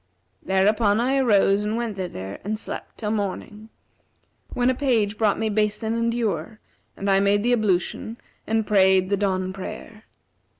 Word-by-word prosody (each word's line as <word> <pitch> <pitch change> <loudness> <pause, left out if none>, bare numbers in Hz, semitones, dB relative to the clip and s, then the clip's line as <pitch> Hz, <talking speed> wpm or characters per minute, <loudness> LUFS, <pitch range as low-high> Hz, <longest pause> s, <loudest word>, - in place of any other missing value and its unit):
Thereupon 205 +3 +2
I 260 +3 +1
arose 205 -5 +3
and 215 +2 -1
went 235 -3 -3
thither 100 - -6
and 215 +2 -2
slept - - -7
till 210 -2 -3
morning, 210 +1 -4 0.8
when 250 +1 +2
a - - 0
page 235 -6 +1
brought 210 -2 +1
me 220 - -1
basin 215 +1 0
and 230 0 0
ewer, 215 -3 -2 0.4
and 195 - -4
I 195 -1 +4
made 200 +1 +2
the 245 +1 +2
ablution 215 +1 -1 0.3
and 220 0 +1
prayed 190 -2 +3
the 200 - +2
dawn 185 -2 -1
prayer. 210 +3 -9
210 Hz, 160 wpm, -23 LUFS, 195-225 Hz, 0.8 s, I